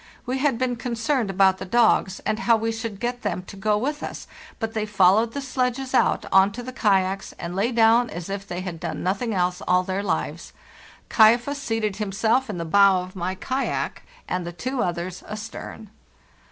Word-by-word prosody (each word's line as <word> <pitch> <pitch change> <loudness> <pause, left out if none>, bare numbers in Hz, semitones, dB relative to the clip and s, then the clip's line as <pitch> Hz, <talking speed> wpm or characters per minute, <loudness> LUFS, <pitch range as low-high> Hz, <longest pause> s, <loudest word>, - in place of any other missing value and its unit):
We 260 +2 -2
had 270 -3 +1
been 250 -1 -1
concerned 240 0 -1
about 190 0 +3
the - - -4
dogs 200 -2 +2
and 215 0 -1
how 235 -1 +4
we 225 +1 -1
should 225 -3 -5
get 245 +1 -3
them 185 -3 -2
to 190 - -11
go 210 +1 +1
with 295 +7 -2
us, - - -6 0.3
but 225 -1 -3
they 215 -1 -2
followed 205 +3 +4
the 280 - -3
sledges 255 0 -2
out - - +2
on 190 +1 +5
to 245 +3 -6
the 255 +1 -7
kayaks 195 -4 +1
and 170 +1 -6
lay 210 +6 +1
down 230 +1 +4
as 170 -1 -6
if 195 0 -5
they 175 0 -4
had 180 -3 -6
done - - -4
nothing 200 +6 -1
else 180 -2 0
all 180 0 +3
their 190 +1 -2
lives. 205 - -3 0.3
' - - -23
Kaifas' 240 +6 +4
seated 225 -5 -1
himself 220 +5 0
in 200 - -4
the 170 - -3
bow 195 +2 +5
of 185 +1 -11
my 185 +1 -2
kayak, 260 +7 -2 0.3
and 180 0 -2
the 170 - -5
two 255 +9 -3
others 175 -1 -3
astern. 215 0 -8
215 Hz, 200 wpm, -24 LUFS, 190-240 Hz, 0.3 s, on